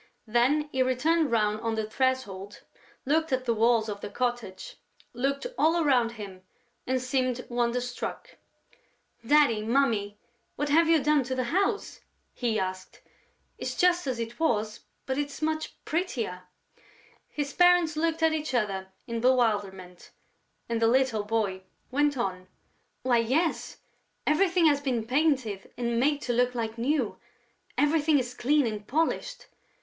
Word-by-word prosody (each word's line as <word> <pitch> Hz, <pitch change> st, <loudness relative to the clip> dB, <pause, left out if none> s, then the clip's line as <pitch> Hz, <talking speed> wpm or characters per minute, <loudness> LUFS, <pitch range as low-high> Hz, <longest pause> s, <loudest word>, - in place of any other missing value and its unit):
Then 250 Hz, +7 st, +2 dB
he 260 Hz, -, 0 dB
turned 320 Hz, +3 st, +2 dB
round 215 Hz, -2 st, +1 dB
on 225 Hz, -1 st, -1 dB
the 220 Hz, -1 st, -2 dB
threshold, 215 Hz, -5 st, -2 dB, 0.4 s
looked 315 Hz, +3 st, +1 dB
at 260 Hz, 0 st, 0 dB
the 235 Hz, -, +2 dB
walls 225 Hz, 0 st, +3 dB
of 205 Hz, -1 st, -5 dB
the -, -, -5 dB
cottage, 245 Hz, -, -4 dB, 0.4 s
looked 275 Hz, +3 st, -1 dB
all 325 Hz, +2 st, +3 dB
around 250 Hz, -7 st, +2 dB
him 200 Hz, -4 st, -9 dB, 0.5 s
and 260 Hz, 0 st, +1 dB
seemed 255 Hz, -1 st, -1 dB
wonderstruck: 245 Hz, 0 st, -3 dB, 0.9 s
"Daddy, 275 Hz, -4 st, +4 dB
Mummy, 220 Hz, -4 st, +1 dB, 0.4 s
what 290 Hz, +1 st, -2 dB
have 325 Hz, +3 st, +4 dB
you 320 Hz, -4 st, +4 dB
done 300 Hz, -1 st, +3 dB
to 260 Hz, +1 st, -3 dB
the 255 Hz, -, 0 dB
house?" 400 Hz, +2 st, 0 dB, 0.3 s
he 235 Hz, -3 st, -1 dB
asked. 185 Hz, 0 st, -5 dB, 0.6 s
"It's -, -, -4 dB
just 355 Hz, -3 st, +2 dB
as 255 Hz, -2 st, -1 dB
it 230 Hz, +2 st, -5 dB
was, 220 Hz, -8 st, 0 dB, 0.3 s
but 265 Hz, +1 st, -2 dB
it's 285 Hz, -1 st, -4 dB
much 315 Hz, 0 st, -2 dB
prettier." 240 Hz, -, -2 dB, 0.8 s
His 285 Hz, -1 st, -4 dB
parents 355 Hz, -3 st, +4 dB
looked 325 Hz, +1 st, 0 dB
at 320 Hz, -1 st, +4 dB
each 305 Hz, -4 st, -2 dB
other 195 Hz, -5 st, -1 dB, 0.2 s
in 230 Hz, -1 st, -4 dB
bewilderment; 205 Hz, -8 st, 0 dB, 0.6 s
and 230 Hz, -1 st, -2 dB
the 225 Hz, -, +5 dB
little 240 Hz, -3 st, +2 dB
boy 205 Hz, -3 st, -1 dB, 0.3 s
went 290 Hz, +1 st, +1 dB
on: 185 Hz, -5 st, -3 dB, 0.6 s
"Why, 250 Hz, -2 st, +3 dB
yes, 280 Hz, +9 st, 0 dB, 0.5 s
everything 355 Hz, +2 st, +3 dB
has 290 Hz, -2 st, +4 dB
been 250 Hz, -5 st, -1 dB
painted 255 Hz, -7 st, 0 dB
and 235 Hz, -1 st, -1 dB
made 290 Hz, +3 st, +1 dB
to 245 Hz, -, -1 dB
look 250 Hz, +1 st, +1 dB
like 225 Hz, -2 st, -3 dB
new; 255 Hz, -2 st, 0 dB, 0.6 s
everything 295 Hz, 0 st, +3 dB
is 250 Hz, -2 st, -2 dB
clean 285 Hz, +3 st, +2 dB
and 215 Hz, -2 st, -4 dB
polished.... 330 Hz, -, -1 dB
250 Hz, 145 wpm, -27 LUFS, 225-295 Hz, 0.9 s, the